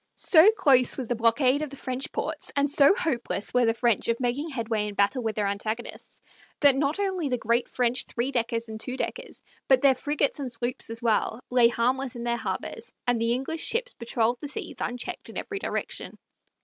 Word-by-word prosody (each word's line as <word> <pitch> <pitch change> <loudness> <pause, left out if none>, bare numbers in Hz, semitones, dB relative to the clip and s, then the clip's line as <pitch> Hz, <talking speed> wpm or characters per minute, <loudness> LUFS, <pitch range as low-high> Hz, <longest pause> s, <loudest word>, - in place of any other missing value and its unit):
So 340 +4 +6
close 270 - +4
was 255 -4 -5
the 245 - +1
blockade 250 +5 +2
of 305 - -3
the 275 - -10
French 260 0 -3
ports, - - -2
and 285 0 +3
so 285 +5 +5
hopeless 245 - -2
were 250 -2 +3
the 225 - +2
French 235 -3 +1
of 230 0 0
making 260 +6 -1
headway 225 -6 -2
in 205 - -6
battle 205 +7 +2
with 220 -2 -2
their 210 - 0
antagonists, 215 +4 -5 0.4
that 285 -2 +6
not 280 +4 0
only 375 -7 -1
the 250 - 0
great 235 +1 0
French 245 0 0
three 240 +3 -2
deckers 230 -2 -1
and 220 0 -7
two 250 +3 -5
deckers, - - -5 0.2
but 265 -1 +5
their 275 -1 +6
frigates 290 +2 0
and 265 -3 -4
sloops 240 0 -2
as 230 +1 -5
well, 220 0 +1
lay 245 -2 +6
harmless 250 +2 -1
in 235 - -6
their 235 0 0
harbors, - - -5
and 245 -1 +1
the 230 +1 +1
English 270 +6 -2
ships - - 0
patroled 235 0 -1
the 295 - -6
seas 285 - -6
unchecked 245 0 -5
in - - -8
every 405 -3 -4
direction. - - -5
250 Hz, 205 wpm, -26 LUFS, 230-280 Hz, 0.4 s, So